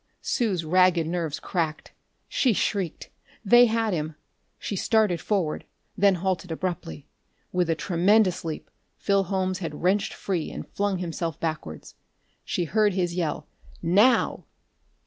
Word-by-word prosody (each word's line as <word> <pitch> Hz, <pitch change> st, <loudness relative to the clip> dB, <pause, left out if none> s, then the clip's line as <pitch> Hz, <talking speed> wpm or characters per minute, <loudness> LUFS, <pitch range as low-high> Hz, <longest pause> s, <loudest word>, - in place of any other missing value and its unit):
Sue's 195 Hz, -, 0 dB
ragged 180 Hz, 0 st, +4 dB
nerves 165 Hz, -2 st, -2 dB
cracked: 160 Hz, -4 st, -3 dB, 0.4 s
she 250 Hz, -4 st, +2 dB
shrieked. 195 Hz, -4 st, -2 dB, 0.3 s
They 240 Hz, +4 st, +7 dB
had 225 Hz, -2 st, 0 dB
him! 155 Hz, -1 st, -3 dB, 0.4 s
She 205 Hz, -, -4 dB
started 200 Hz, -4 st, +2 dB
forward, 185 Hz, -7 st, -1 dB, 0.3 s
then 200 Hz, -1 st, +4 dB
halted 185 Hz, -1 st, -2 dB
abruptly. 160 Hz, -, -4 dB, 0.5 s
With 180 Hz, -2 st, 0 dB
a 165 Hz, -, +2 dB
tremendous 180 Hz, +5 st, +2 dB
leap, 160 Hz, -2 st, -6 dB, 0.3 s
Phil 200 Hz, -1 st, +1 dB
Holmes 185 Hz, 0 st, -1 dB
had 160 Hz, -3 st, -6 dB
wrenched 195 Hz, +3 st, +1 dB
free 180 Hz, -5 st, -2 dB
and -, -, -7 dB
flung 200 Hz, -1 st, -1 dB
himself 170 Hz, -3 st, -4 dB
backwards. 155 Hz, -, -5 dB, 0.5 s
She 175 Hz, -, -1 dB
heard 210 Hz, +4 st, +2 dB
his 175 Hz, -2 st, 0 dB
yell: 170 Hz, -4 st, -2 dB, 0.4 s
"Now!" 205 Hz, +9 st, +3 dB
180 Hz, 130 wpm, -26 LUFS, 165-200 Hz, 0.5 s, They